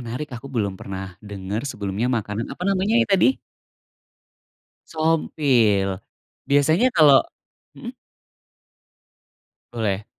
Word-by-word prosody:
menarik 125 +4 -6
aku 125 +3 -8
belum 105 -7 -3
pernah 95 0 -6 0.2
denger 100 0 -5
sebelumnya 100 0 -3
makanan 110 -2 -2
apa - - -8
namanya 195 +3 +1
ya - - +2
tadi? 195 +8 +4 1.5
Sompil, 140 -10 +1 0.6
biasanya 145 - +3
kalo 150 -5 +6 0.5
mhm. 245 +1 -8 1.8
Boleh. 105 -4 -2
125 Hz, 95 wpm, -22 LUFS, 105-160 Hz, 1.8 s, kalo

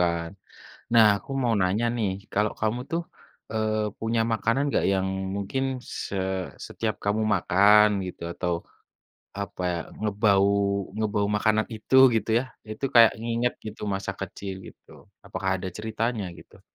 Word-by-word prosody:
kan. 85 -1 0 0.6
Nah, 115 -1 +8
aku 100 - -16
mau 120 -2 +2
nanya 95 +6 +1
nih, 105 -4 0 0.2
kalau 105 +1 +1
kamu 110 +3 0
tuh, 170 +1 0 0.5
eee, 110 -1 0
punya 115 0 0
makanan 115 +4 +1
nggak, - - +1
yang 95 0 +1 0.3
mungkin 100 +7 -2 0.2
se 100 - -5 0.5
setiap - - -2
kamu 105 +2 +1
makan 100 +4 +5 0.2
gitu 90 - -8
atau, 90 0 -1 0.9
apa 100 -2 -5
ya, 85 - -1 0.2
ngebau 100 -1 +3 0.5
ngebau 105 -1 0
makanan 110 +1 +2
itu, 110 +4 0 0.2
gitu 110 0 0
ya, - - -4 0.3
itu 110 +5 -5
kayak 115 -2 +8
nginget 120 +1 0
gitu, 110 - -8
masa 95 - -3
kecil, 100 -1 -5
gitu? - - -18 0.4
Apakah 95 - -2
ada 95 - -4
ceritanya, 110 0 -2
gitu? - - -16
105 Hz, 145 wpm, -26 LUFS, 100-115 Hz, 0.9 s, Nah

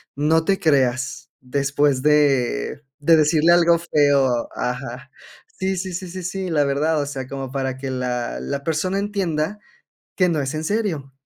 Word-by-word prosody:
"No 160 +3 +2
te 195 +2 +1
creas", 130 -2 0
después 140 +1 0
de 140 - +2 0.2
de 160 +3 +5
decirle 155 +2 +4
algo 170 -1 +4
feo. 140 -7 +2
Ajá 125 +1 -4 0.5
sí 190 0 0
sí 185 0 -4
sí 185 +2 -5
sí 185 +1 -7
sí, 190 +1 -3
la 150 -3 +2
verdad, 150 +3 +1
o - - -2
sea, 135 -2 -5
como 135 -1 -6
para 130 -1 -2
que 135 0 -5
la 125 - -3
la 140 - -4
persona 165 +5 -1
entienda 200 -2 -2 0.6
que 185 -2 +3
no 160 -3 0
es 135 -1 -2
en 155 +1 -3
serio. 165 -9 -2
145 Hz, 165 wpm, -22 LUFS, 135-170 Hz, 0.6 s, de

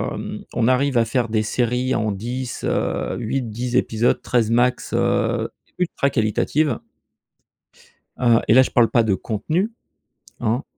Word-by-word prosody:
hem, - - -6
on 115 -1 +1
arrive 130 +1 +2
à 115 - +4
faire 120 0 -1
des 110 -1 +1
séries 125 +3 0
en 110 -2 0
10, 120 +5 -5
heu, - - -1
8-10 120 0 -3
épisodes, 115 +2 +1
13 115 -3 +1
max, 120 +1 +1
heu, 120 -1 +1 0.3
ultra 175 -6 0
qualitatives. 130 +4 0 1.4
Heu, 120 -2 +4
et - - +5
là, 130 - +8
je 130 - 0
parle 120 -2 +4
pas 120 - +3
de 110 -3 +1
contenu, 155 - -2 0.7
hein. 120 +3 0
120 Hz, 145 wpm, -21 LUFS, 115-125 Hz, 1.4 s, là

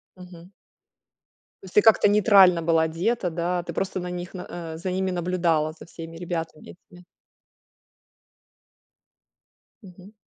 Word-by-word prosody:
Мгм. 180 0 -14 1.1
То - - -13
есть 185 - -14
ты 210 - +7
как-то 220 -2 +5
нейтрально 195 -4 +5
была 165 0 +2
одета, 180 +6 -1
да, 175 +1 -2
ты - - -7
просто 190 -1 -3
на 180 0 -5
них 180 0 -7
на, 180 -2 -7 0.3
э, - - -7
за 180 +3 -4
ними 190 +1 -1
наблюдала, 170 -3 0
за 160 - -14
всеми 165 -1 -10
ребятами 165 -2 -6
этими? 180 0 -19 2.8
Мгм. 190 0 -15
180 Hz, 135 wpm, -24 LUFS, 165-185 Hz, 2.8 s, ты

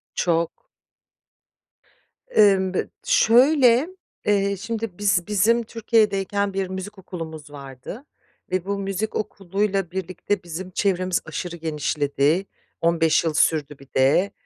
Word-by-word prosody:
Çok. 170 -1 +1 1.8
Imm, 190 -3 +4
bı - - -1
şöyle, 255 +3 +5 0.4
eee, 200 -1 +2
şimdi 225 -2 -4
biz 200 -3 +1
bizim 220 +3 +3
Türkiye'deyken 205 -3 +1
bir 195 -1 -1
müzik 190 +2 -6
okulumuz 160 -5 -8
vardı 140 - -9 0.5
ve 185 -1 -1
bu 200 0 -2
müzik 195 +2 -3
okuluyla 195 -2 -2
birlikte 190 +1 -3
bizim 175 +2 -7
çevremiz 185 -2 0
aşırı 170 +2 -5
genişledi, 150 +1 0 0.4
15 165 -1 +3
yıl 160 - 0
sürdü 150 -2 +1
bir 140 - -15
de. 145 +10 +3
190 Hz, 110 wpm, -23 LUFS, 165-205 Hz, 1.8 s, şöyle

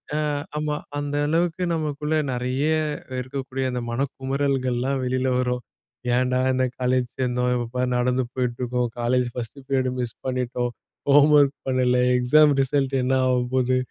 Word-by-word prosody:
ஆ - - +1 0.4
ஆமா, 150 0 -1 0.2
அந்த 145 0 -3
அளவுக்கு 170 +2 0
நமக்குள்ள 150 -1 -1 0.2
நெறைய 125 +3 -1 0.6
இருக்கக்கூடிய 130 0 -4
அந்த 125 -1 -2
மனக்குமறல்கள்லாம் 135 0 -1
வெளில 130 +1 0
வரும். 125 -1 0 0.5
ஏன்டா! 125 0 +1
இந்த 130 0 +2
காலேஜ் 125 0 +1
சேர்ந்தோம்? 125 -1 +1
இப்ப 120 -1 -2
பாரு 125 0 +1
நடந்து 125 +1 +1
போயிட்டு 125 -2 -2
இருக்கோம். 125 0 0
காலேஜ் 125 +1 +1
ஃபர்ஸ்ட் 125 +3 -6
பீரியட் 130 -2 +1
மிஸ் 120 -2 -3
பண்ணிட்டோம். 125 -1 -1 0.4
ஹோம்வொர்க் 145 0 +6
பண்ணல, 125 -1 +2 0.2
எக்ஸாம் 145 +4 +5
ரிசல்ட் 135 0 0
என்ன 130 +1 +2
ஆக 125 -1 +3 0.2
போது, 130 0 +2
130 Hz, 140 wpm, -24 LUFS, 125-140 Hz, 0.6 s, ஹோம்வொர்க்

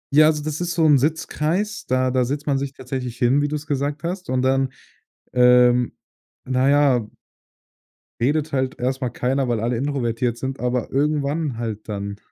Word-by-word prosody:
Ja, 155 +1 +8
also 150 -1 +1
das 155 +2 -4
ist 175 0 -1
so 165 -2 +3
'n 145 -3 +6
Sitzkreis, 165 - -1
da 130 0 +1
da 130 -1 +2
setzt 145 +4 -3
man 140 -2 +1
sich 140 0 -4
tatsächlich 125 -2 -5
hin, 125 +4 +3
wie 145 - +1
du's 150 0 -4
gesagt 145 +1 -2
hast. 180 +2 -4
Und 130 0 0
dann, 135 0 +2 0.6
ähm, 125 0 +4 0.5
na 130 +1 +2
ja 140 -6 +3 1.1
redet 150 +4 0
halt 130 -1 -1
erst 130 +2 -1
mal 125 - 0
keiner, 130 +2 -1
weil 120 -2 0
alle 120 +2 -1
introvertiert 120 -3 -1
sind, 135 +1 -4
aber 125 -1 -1
irgendwann 145 -1 0
halt 110 -2 -5
dann. 100 -1 -4
135 Hz, 175 wpm, -22 LUFS, 125-150 Hz, 1.1 s, Ja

